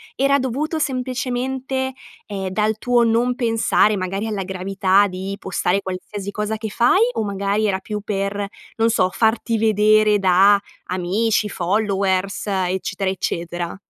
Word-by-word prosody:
era 275 Hz, +1 st, +3 dB
dovuto 280 Hz, +5 st, -2 dB
semplicemente, 260 Hz, -1 st, -2 dB, 0.3 s
ehm, 195 Hz, -2 st, -4 dB
dal 210 Hz, +3 st, 0 dB
tuo 240 Hz, +1 st, +2 dB
non 235 Hz, +2 st, +2 dB
pensare 225 Hz, -3 st, +2 dB
magari 195 Hz, +3 st, -3 dB
alla 210 Hz, -3 st, -2 dB
gravità 190 Hz, +1 st, +2 dB
di 190 Hz, +1 st, -5 dB
postare 190 Hz, 0 st, 0 dB
qualsiasi 190 Hz, +2 st, -6 dB
cosa 210 Hz, +1 st, -3 dB
che 220 Hz, 0 st, -5 dB
fai 245 Hz, -, +3 dB
o 220 Hz, -, -1 dB
magari 200 Hz, +1 st, -1 dB
era 190 Hz, -2 st, 0 dB
più 210 Hz, -1 st, -3 dB
per, 200 Hz, -1 st, -2 dB, 0.3 s
non 225 Hz, 0 st, +2 dB
so, 190 Hz, -5 st, +2 dB
farti 225 Hz, +3 st, +1 dB
vedere 215 Hz, -1 st, +4 dB
da 195 Hz, +2 st, +5 dB, 0.3 s
amici, 205 Hz, +5 st, 0 dB
followers, 195 Hz, 0 st, -1 dB
eccetera, 190 Hz, 0 st, -1 dB
eccetera. 175 Hz, -1 st, -3 dB
205 Hz, 135 wpm, -21 LUFS, 190-230 Hz, 0.3 s, da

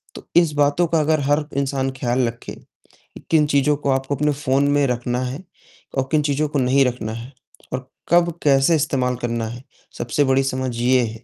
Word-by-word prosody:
तो -, -, -10 dB
इस 170 Hz, -3 st, +5 dB
बातों 145 Hz, +4 st, +2 dB
का 165 Hz, -1 st, +1 dB
अगर 155 Hz, +1 st, +2 dB
हर 145 Hz, +2 st, +1 dB
इंसान 135 Hz, -1 st, -1 dB
ख्याल 120 Hz, 0 st, +1 dB
रखे 115 Hz, 0 st, -7 dB
कि -, -, -20 dB
किन 155 Hz, -2 st, +4 dB
चीज़ों 145 Hz, 0 st, +2 dB
को 140 Hz, -, -3 dB
आपको 135 Hz, +1 st, -1 dB
अपने 150 Hz, +2 st, +1 dB
फ़ोन 140 Hz, 0 st, +1 dB
में 145 Hz, -1 st, +3 dB
रखना 125 Hz, 0 st, -2 dB
है 135 Hz, +8 st, -6 dB, 0.5 s
और 135 Hz, 0 st, 0 dB
किन 155 Hz, -1 st, +3 dB
चीज़ों 145 Hz, +1 st, 0 dB
को 145 Hz, -, -1 dB
नहीं 130 Hz, +2 st, +3 dB
रखना 115 Hz, -3 st, -3 dB
है 120 Hz, +4 st, -8 dB, 0.4 s
और 130 Hz, 0 st, -4 dB, 0.2 s
कब 170 Hz, 0 st, +4 dB
कैसे 140 Hz, +3 st, +4 dB
इस्तेमाल 135 Hz, -4 st, 0 dB
करना 115 Hz, -1 st, -2 dB
है, 120 Hz, +3 st, -8 dB, 0.3 s
सबसे 120 Hz, +5 st, 0 dB
बड़ी 135 Hz, 0 st, +2 dB
समझ 130 Hz, -2 st, -2 dB
यह 125 Hz, 0 st, +3 dB
है 115 Hz, +2 st, -12 dB
135 Hz, 200 wpm, -21 LUFS, 125-145 Hz, 0.5 s, इस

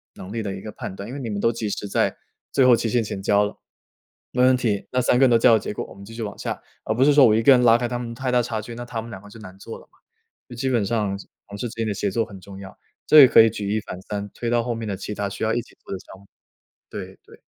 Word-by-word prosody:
能 95 Hz, +4 st, -9 dB
力 115 Hz, -, -2 dB
的 100 Hz, -2 st, -3 dB
一 -, -, -8 dB
个 105 Hz, -, -7 dB
判 95 Hz, -, -7 dB
断。 100 Hz, +2 st, -7 dB
因 125 Hz, -, -8 dB
为 140 Hz, -, -6 dB
你 115 Hz, -, -4 dB
们 100 Hz, -1 st, -3 dB
都 115 Hz, -, +2 dB
及 110 Hz, -2 st, -4 dB
时 100 Hz, -, -4 dB
在， -, -, 0 dB, 0.3 s
最 135 Hz, -, +3 dB
后 125 Hz, -1 st, +7 dB
期 115 Hz, -, -2 dB
限 120 Hz, 0 st, +1 dB
前 100 Hz, -2 st, -5 dB
交 105 Hz, +1 st, +3 dB
了。 105 Hz, -, -6 dB, 0.8 s
没 125 Hz, -, +2 dB
问 130 Hz, 0 st, +6 dB
题， 110 Hz, -5 st, -1 dB
那 125 Hz, -, +1 dB
3 125 Hz, -, +3 dB
个 130 Hz, -, +2 dB
人 130 Hz, -, +6 dB
都 115 Hz, -, +5 dB
交 115 Hz, +1 st, +5 dB
了 110 Hz, -, +5 dB
结 -, -, -5 dB
果， -, -, -4 dB
我 -, -, -13 dB
们 100 Hz, -, -12 dB
继 115 Hz, -, -12 dB
续 115 Hz, -, -7 dB
往 100 Hz, -1 st, -6 dB
下。 -, -, -5 dB, 0.2 s
而 -, -, -1 dB
不 130 Hz, -, +3 dB
是 145 Hz, -, +5 dB
说 140 Hz, -2 st, +7 dB
我 110 Hz, -, +5 dB
一 115 Hz, -, +2 dB
个 140 Hz, -, +7 dB
人 125 Hz, -1 st, +4 dB
拉 115 Hz, -1 st, +6 dB
开 120 Hz, 0 st, -2 dB
他 120 Hz, 0 st, -3 dB
们 115 Hz, -1 st, -5 dB
太 130 Hz, +1 st, -3 dB
大 125 Hz, -, +3 dB
差 115 Hz, -2 st, -3 dB
距， 115 Hz, +2 st, -9 dB
那 120 Hz, -, -6 dB
他 115 Hz, -2 st, -4 dB
们 115 Hz, -, -10 dB
2 95 Hz, -, -8 dB
个 105 Hz, -, -13 dB
就 115 Hz, -, -13 dB
难 95 Hz, -3 st, -12 dB
做 115 Hz, -, -9 dB
了 -, -, -17 dB
嘛。 -, -, -29 dB, 0.5 s
就 120 Hz, -, -9 dB
基 130 Hz, +3 st, -1 dB
本 115 Hz, -5 st, +1 dB
上 105 Hz, -3 st, -1 dB
是 -, -, -11 dB, 0.2 s
同 100 Hz, -, -9 dB
事 120 Hz, -, -3 dB
之 -, -, -12 dB
间 115 Hz, -1 st, -2 dB
的 105 Hz, -, -1 dB
协 100 Hz, 0 st, -2 dB
作 115 Hz, +3 st, 0 dB
很 100 Hz, -3 st, -12 dB
重 95 Hz, +1 st, -11 dB
要， 95 Hz, -1 st, -11 dB, 0.3 s
这 155 Hz, -1 st, +9 dB
也 130 Hz, -, +10 dB
可 115 Hz, -, +7 dB
以 115 Hz, -, +5 dB
举 100 Hz, -2 st, -5 dB
一 110 Hz, -, +1 dB
反 90 Hz, -, -8 dB
三， 100 Hz, +1 st, -5 dB
推 120 Hz, -, -4 dB
到 120 Hz, 0 st, +2 dB
后 120 Hz, 0 st, -2 dB
面 115 Hz, 0 st, -5 dB
的 100 Hz, -2 st, -3 dB
其 -, -, -6 dB
它 100 Hz, -1 st, -2 dB
需 100 Hz, -, -6 dB
要 110 Hz, 0 st, +1 dB
一 120 Hz, -, 0 dB
起 -, -, -19 dB
做 -, -, -12 dB
的 95 Hz, -, -3 dB
项 95 Hz, -, -14 dB
目。 100 Hz, -, -20 dB, 0.6 s
对， -, -, -8 dB
对。 -, -, -17 dB
115 Hz, 355 characters per minute, -23 LUFS, 100-120 Hz, 0.8 s, 也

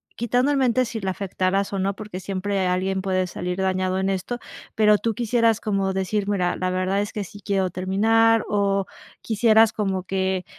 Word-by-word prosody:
quitando 245 Hz, +4 st, +1 dB
en 285 Hz, -, +1 dB
mente 255 Hz, -1 st, +2 dB
si 225 Hz, -1 st, -5 dB
la 190 Hz, 0 st, -1 dB
afectaras 195 Hz, +1 st, -1 dB
o -, -, -1 dB
no, 195 Hz, +1 st, -1 dB
porque 210 Hz, -3 st, -7 dB
siempre 195 Hz, +1 st, -2 dB
alguien 190 Hz, +1 st, 0 dB
puede 185 Hz, -1 st, 0 dB
salir 180 Hz, 0 st, -4 dB
dañado 185 Hz, -1 st, 0 dB
en 190 Hz, 0 st, 0 dB
esto. 195 Hz, +6 st, -2 dB, 0.4 s
Pero, 210 Hz, -1 st, +5 dB
¿tú 225 Hz, +2 st, -1 dB
quisieras 230 Hz, 0 st, +1 dB
como 195 Hz, -3 st, 0 dB
decir: 195 Hz, +2 st, -1 dB
"Mira, 180 Hz, -3 st, 0 dB
la 185 Hz, -, -2 dB
verdad 185 Hz, +2 st, 0 dB
es 205 Hz, -, -4 dB
que 210 Hz, -, -3 dB
sí 205 Hz, +2 st, -12 dB
quiero 195 Hz, -2 st, +1 dB
terminar?" 220 Hz, +5 st, +2 dB
¿O 200 Hz, -1 st, +1 dB, 0.4 s
quisieras 220 Hz, 0 st, +4 dB
como 195 Hz, -4 st, -2 dB
que, 190 Hz, -1 st, -1 dB
195 Hz, 185 wpm, -23 LUFS, 185-220 Hz, 0.4 s, Pero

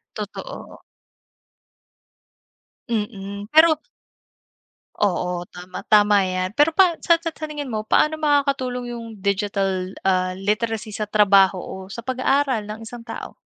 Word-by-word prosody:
Totoo. 215 Hz, -, -8 dB, 2.1 s
Mm, 205 Hz, -2 st, -4 dB
pero 315 Hz, 0 st, +6 dB, 1.2 s
Oo, 180 Hz, -3 st, 0 dB
tama, 180 Hz, +1 st, -9 dB
tama 210 Hz, -1 st, +5 dB
'yan, 185 Hz, 0 st, -2 dB
pero 295 Hz, +3 st, +4 dB
pa 365 Hz, -4 st, +4 dB
sa 340 Hz, -, +6 dB
sa 335 Hz, -, -3 dB
taningin 300 Hz, -3 st, -6 dB
mo 215 Hz, -1 st, -3 dB
paano 310 Hz, +7 st, +3 dB
makakatulong 275 Hz, -5 st, 0 dB
yung 230 Hz, -1 st, -7 dB
digital, 195 Hz, -1 st, -1 dB
ah, 185 Hz, -1 st, +1 dB
literacy 215 Hz, +3 st, -2 dB
sa 215 Hz, -, -2 dB
trabaho 195 Hz, -3 st, +4 dB
o -, -, -7 dB, 0.2 s
sa 235 Hz, -, -6 dB
pag-aaral 260 Hz, -1 st, +1 dB
ng 215 Hz, +1 st, -7 dB
isang 240 Hz, -1 st, -10 dB
tao? 230 Hz, -, -7 dB
215 Hz, 120 wpm, -22 LUFS, 195-275 Hz, 2.1 s, pero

